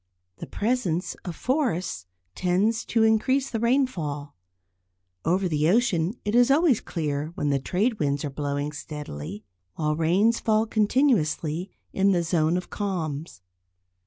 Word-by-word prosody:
The - - -7
presence 205 -6 -1
of 175 -3 -5
forests 215 - -1 0.3
tends 195 +5 +1
to 225 -1 +2
increase 255 +5 +2
the 225 - -1
rainfall. 185 - 0 0.9
Over 185 +4 +2
the 155 -1 +1
ocean 195 -3 +2
it 205 - -1
is 245 +1 +5
always 285 -4 +4
clear 150 -3 -2
when 145 -6 0
the 140 - +2
trade 210 - 0
winds 145 -1 0
are 145 - -4
blowing 145 +1 -2
steadily, 110 - -7 0.3
while 150 -1 0
rains 185 +9 +2
fall 220 0 +2
continuously 205 - +1 0.2
in 195 +1 +3
the 175 -2 +1
zone 165 0 +1
of 180 - -6
calms. 160 - -4
180 Hz, 135 wpm, -25 LUFS, 150-225 Hz, 0.9 s, is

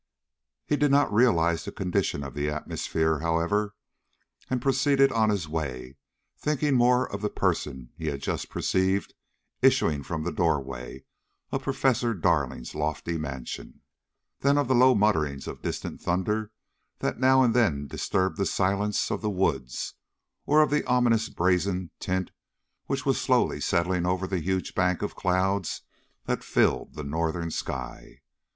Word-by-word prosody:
He 150 - +1
did 145 0 +3
not 140 -5 +3
realize 85 -8 +3
the - - -6
condition 90 -6 -1
of 70 -3 -7
the 75 0 -1
atmosphere, 80 +1 -1
however, 85 +6 0 0.7
and 130 - 0
proceeded 135 +1 +3
on 110 -1 +2
his 100 -6 -1
way, 70 -5 -4 0.4
thinking 150 -1 0
more 125 0 +4
of 100 - -4
the 105 - 0
person 65 -9 -2
he - - -6
had 70 - -2
just - - -3
perceived 95 +1 0 0.5
issuing 75 -3 +3
from 80 +3 -4
the 90 - -2
door 80 -4 +2
way 65 -1 -8 0.5
of - - -1
Professor 120 -3 +1
Darling's 80 -9 0
lofty 75 +2 -2
mansion, 65 -5 -6 0.6
than 140 +1 +3
of 145 -3 +2
the 130 - +3
low 130 +1 +6
mutterings 80 -10 +1
of - - -7
distant - - -4
thunder 105 +5 -1 0.5
that - - -2
now 130 0 +5
and 120 -3 +3
then 85 - +2
disturbed 95 +6 -1
the 100 - 0
silence 100 +2 0
of - - -2
the 105 - -1
woods, 70 -11 -1 0.5
or 155 +1 +6
of 150 - -1
the 150 - +2
ominous, 120 -3 +2
brazen 90 0 0
tint 95 0 -2 0.6
which - - -2
was - - +1
slowly - - +2
settling 90 +1 +1
over 90 +1 0
the 95 -1 -2
huge 95 +3 -2
bank 90 +1 +1
of 105 - -3
cloud 95 0 +1 0.6
that - - -2
filled - - +1
the 75 - -5
northern 80 +3 -2
sky. 65 -4 -6
95 Hz, 155 wpm, -27 LUFS, 80-115 Hz, 0.7 s, low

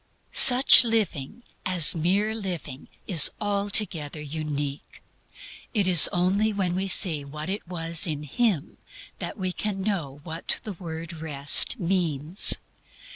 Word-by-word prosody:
Such 255 +1 +7
living, 220 - -4 0.2
as 180 -4 +4
mere 195 +7 -1
living, 175 -10 -8 0.2
is 165 -7 +7
altogether 200 -7 -1
unique. 150 -1 -8 0.7
It 200 -3 0
is 175 -3 +7
only 190 +5 -1
when 190 -4 -4
we 190 +2 -4
see 170 -6 +1
what 150 +4 -10
it 200 -2 -8
was 165 -1 -3
in 150 -2 -5
Him 175 - -4 0.4
that - - -7
we 185 -2 -5
can 200 +1 -6
know 165 -10 -5
what 165 0 -5
the 210 - -8
word 165 -1 -10
Rest 155 - +3
means. 170 -2 0
175 Hz, 130 wpm, -23 LUFS, 155-200 Hz, 0.7 s, Such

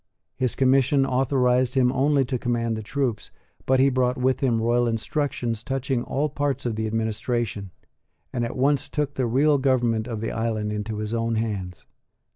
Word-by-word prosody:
His 125 -2 -1
commission 135 +1 +3
authorised 130 -1 +1
him 125 -2 +4
only 135 +1 +2
to 125 0 -2
command 115 -2 -1
the 110 - -4
troops, 120 -1 -2 0.4
but 130 0 +3
he 135 +1 +5
brought 125 0 +1
with 130 +1 +1
him 120 -4 +1
royal 120 +2 +2
instructions 115 -1 -2
touching 135 -1 -1
all 140 +4 -1
parts 145 -2 -2
of 115 -3 -1
the 110 0 -2
administration, 110 -1 -2 0.6
and 120 -2 -1
at 120 +3 -4
once 140 +1 +1
took 145 -1 -2
the 130 -3 -1
real 140 +5 +3
government 120 -4 +1
of 115 -3 -4
the 115 - -3
island 110 -2 -2
into 105 +1 -4
his 105 +1 -3
own 115 0 0
hands. 100 -5 -3
125 Hz, 175 wpm, -24 LUFS, 115-135 Hz, 0.6 s, he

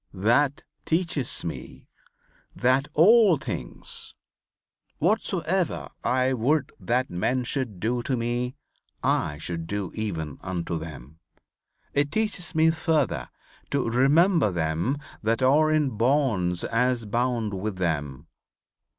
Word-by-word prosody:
That 125 +8 +2 0.2
teaches 160 - -1
me 70 -7 -7 0.7
that 130 +3 +2
all 200 +1 +6
things, 90 - -4 0.8
whatsoever 185 -1 0
I 130 +1 +2
would 135 +4 +1
that 120 +7 0
men 120 +9 0
should 120 -6 -3
do 120 +5 0
to 130 +2 -1
me 120 +2 -2 0.5
I 75 - +1
should 85 +1 -5
do 100 -1 -3
even 85 -10 -4
unto 85 -3 -3
them. 80 -1 -10 0.7
It 145 0 +1
teaches 200 -5 -2
me 160 +1 +5
further 155 - 0 0.4
to 140 -4 0
'Remember 145 - +4
them 85 - 0 0.2
that 115 +3 0
are 150 +4 +5
in 155 -3 +2
bonds 110 -7 +1
as 120 0 +1
bound 115 -1 0
with 100 +1 -3
them.' 75 -7 -2
125 Hz, 115 wpm, -26 LUFS, 95-145 Hz, 0.8 s, all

